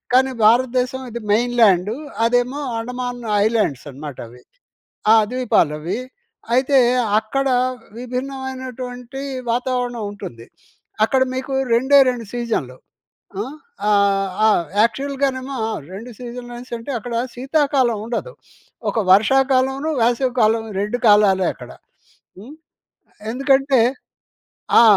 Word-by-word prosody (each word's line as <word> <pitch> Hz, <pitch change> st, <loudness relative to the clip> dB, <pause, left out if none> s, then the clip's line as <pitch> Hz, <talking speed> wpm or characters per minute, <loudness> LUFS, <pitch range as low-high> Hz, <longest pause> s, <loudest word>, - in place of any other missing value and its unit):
కానీ 265 Hz, +1 st, +4 dB, 0.2 s
భారతదేశం 255 Hz, +2 st, +2 dB
ఇది 235 Hz, +1 st, -5 dB
మెయిన్ 240 Hz, +3 st, +1 dB
ల్యాండు, 200 Hz, 0 st, +4 dB, 0.3 s
అదేమో 245 Hz, +4 st, +1 dB, 0.2 s
అండమాన్ 245 Hz, +1 st, -4 dB, 0.2 s
ఐలాండ్సనమాట 145 Hz, -, -2 dB
అవి. 125 Hz, +2 st, -16 dB, 0.7 s
ఆ! -, -, +8 dB, 0.2 s
ద్వీపాలవి. 170 Hz, -8 st, 0 dB, 0.5 s
అయితే, 265 Hz, +2 st, +3 dB, 0.4 s
అక్కడా 265 Hz, +3 st, 0 dB, 0.4 s
విభిన్నమైనటువంటి 255 Hz, 0 st, -6 dB, 0.3 s
వాతావరణం 245 Hz, -1 st, -2 dB
ఉంటుంది. 150 Hz, -, -9 dB, 0.6 s
అక్కడ 260 Hz, +4 st, +2 dB
మీకు 260 Hz, +1 st, -4 dB, 0.2 s
రెండే, 265 Hz, +4 st, +4 dB
రెండు 240 Hz, -2 st, -5 dB
సీజన్‍లు. 225 Hz, -, -3 dB, 0.7 s
ఆ! -, -, -1 dB, 0.5 s
ఆహ్, 200 Hz, -1 st, +3 dB, 0.2 s
ఆ! 220 Hz, -, +6 dB, 0.3 s
యాక్చువల్‌గానేమో 270 Hz, +2 st, -1 dB, 0.3 s
2 225 Hz, +6 st, -8 dB
సీజన్లేన్సంటే 240 Hz, 0 st, -7 dB
అక్కడ 240 Hz, +2 st, -7 dB, 0.2 s
శీతాకాలం 265 Hz, -3 st, +1 dB
ఉండదు. 245 Hz, -, -4 dB, 0.6 s
ఒక -, -, -4 dB, 0.2 s
వర్షాకాలంను, 265 Hz, +6 st, +2 dB
వేసవి 245 Hz, +2 st, +1 dB
కాలం, 220 Hz, +1 st, +3 dB, 0.2 s
2 210 Hz, +4 st, -1 dB
కాలాలే 205 Hz, -3 st, +5 dB
అక్కడ. -, -, -12 dB, 0.7 s
హ్మ్. 255 Hz, +10 st, -11 dB, 0.8 s
ఎందుకంటే, 270 Hz, 0 st, +2 dB, 1.0 s
ఆ! -, -, +8 dB
245 Hz, 95 wpm, -20 LUFS, 220-260 Hz, 1.0 s, ఆ